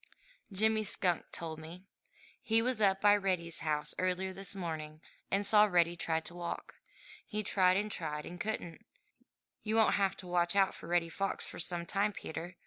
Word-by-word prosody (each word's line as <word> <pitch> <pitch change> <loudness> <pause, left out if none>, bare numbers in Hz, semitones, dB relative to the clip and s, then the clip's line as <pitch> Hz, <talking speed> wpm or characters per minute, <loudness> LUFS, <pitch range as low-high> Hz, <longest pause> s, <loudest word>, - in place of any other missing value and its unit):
"Jimmy 220 +2 +2
Skunk 180 -4 0
told 160 -2 -5
me. 170 +4 -10 0.6
He 225 0 +2
was 250 -2 -1
up 195 -1 +3
by 205 0 +7
Reddy's 180 -4 -1
house 150 -1 -1
early 185 +1 0
this 195 +1 -1
morning 155 -4 -5 0.3
and 200 +1 +1
saw 210 +1 +6
Reddy 175 -3 +3
try 165 -1 0
to 170 - -10
walk. 175 -1 -5 0.5
He 215 0 -3
tried 185 -2 +4
and 210 +1 -1
tried 150 -4 -3
and 175 0 -7
couldn't. 190 -6 -4 0.8
You 215 0 -1
won't 220 -1 +5
have 195 -1 +1
to 185 - -9
watch 175 0 +1
out 195 -1 +4
for - - -11
Reddy 170 -1 +1
Fox 195 +4 -2
for - - -9
some 175 -1 -2
time, 205 +3 0
Peter. 170 0 -6
185 Hz, 180 wpm, -33 LUFS, 170-200 Hz, 0.8 s, by